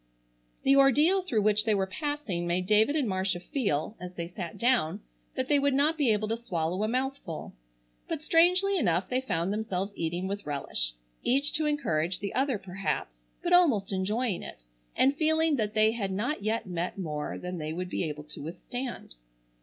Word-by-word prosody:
The 275 - +5
ordeal 295 +8 +5
through 245 - 0
which 215 0 +4
they 220 -2 +2
were 195 -1 +1
passing 205 - -3
made 180 +1 0
David 215 +8 +4
and 285 -6 +1
Marcia 190 -2 0
feel, 200 - -1
as 180 0 -8
they 170 -1 -4
sat 175 -1 -7
down, 220 -7 +2 0.3
that 260 0 -1
they 290 0 +4
would 280 -1 +2
not 295 +4 +3
be 290 -6 +2
able 215 0 +1
to 225 - 0
swallow 175 -2 -1
a 215 - +1
mouthful, 255 - -3 0.5
but 315 -2 -4
strangely 365 +5 +4
enough 175 - +1
they 255 +1 +1
found 195 -6 -1
themselves 205 -2 -2
eating 175 +3 -2
with 200 -1 -5
relish, - - -1 0.3
each 275 +3 +2
to 305 0 +1
encourage 180 - 0
the 200 -1 -4
other 265 -1 +1
perhaps, 185 - -4 0.2
but 350 - +1
almost 275 - +4
enjoying 200 +2 -1
it, - - -9 0.3
and 270 +2 +4
feeling 315 0 +3
that 215 -1 -1
they 215 0 +5
had 205 -4 -3
not 215 +8 -2
yet 220 +2 -1
met 175 0 -3
more 150 -5 -4
than 180 -1 -5
they 155 0 -4
would 180 +2 -4
be - - -1
able 150 -2 -4
to 150 -1 -10
withstand. 240 - -6
210 Hz, 185 wpm, -28 LUFS, 180-275 Hz, 0.5 s, The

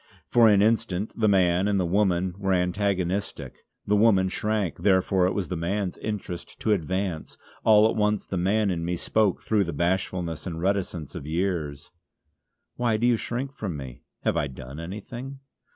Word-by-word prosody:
For 120 -2 +5
an 100 -1 +5
instant 110 -3 0
the 110 -2 +2
man 95 -1 +3
and 100 -1 +1
the 90 - +1
woman 95 -1 +1
were 95 -1 +1
antagonistic. 95 +1 -1 0.2
The 105 - +2
woman 100 -3 +4
shrank, 105 -2 -1
therefore 95 0 +3
it 95 - -2
was 100 -3 -2
the 90 - -2
man's 90 +3 -2
interest 100 -5 -5
to 110 - +1
advance; 95 -2 -2 0.3
all 110 0 +6
at - - -1
once 105 -1 +1
the - - -5
man 100 +3 +1
in 85 -2 -2
me 90 +1 -1
spoke 105 +2 +1
through 105 -3 +2
the 85 - -4
bashfulness 85 0 -1
and 80 -2 -4
reticence 90 -4 -2
of 70 - -7
years: 80 -4 -2 0.9
"Why 120 -3 +1
do 115 - 0
you 120 -1 +4
shrink 125 +4 -4
from 95 - -4
me? 65 -3 -9 0.2
Have - - 0
I 70 - +1
done 65 +2 -9
anything?" 120 +10 -7
95 Hz, 175 wpm, -26 LUFS, 85-105 Hz, 0.9 s, all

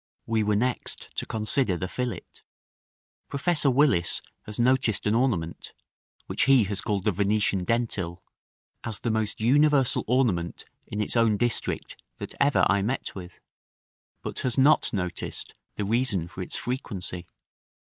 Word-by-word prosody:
We 110 -1 +1
were 105 0 +1
next 125 +4 -2
to - - -2
consider 110 -2 +1
the 90 - -3
fillet. 120 -4 -4 1.0
Professor 145 0 +1
Willis 130 - +3 0.3
has 105 +1 -4
noticed 120 -4 +2
an 105 - +2
ornament, 110 -10 -1 0.5
which - - 0
he 135 -3 +6
has 100 0 -2
called 100 -3 -2
the 105 - +4
Venetian 100 0 +1
dentil, 95 -7 -1 0.6
"as 110 -3 -3
the 115 - 0
most 110 -2 -1
universal 140 +3 +3
ornament 110 -9 0 0.2
in 105 - -3
its 105 - -1
own 115 -3 +3
district 120 +2 -2 0.2
that - - -6
ever 140 0 +4
I 100 - +2
met 120 +7 -2
with;" 90 -2 -9 0.9
but - - -4
has 125 0 -1
not 145 +3 +4
noticed 90 -3 -4 0.2
the 105 - -2
reason 105 -6 +1
for 95 - -8
its 90 - -2
frequency. 95 -8 -4
110 Hz, 145 wpm, -26 LUFS, 95-125 Hz, 1.0 s, he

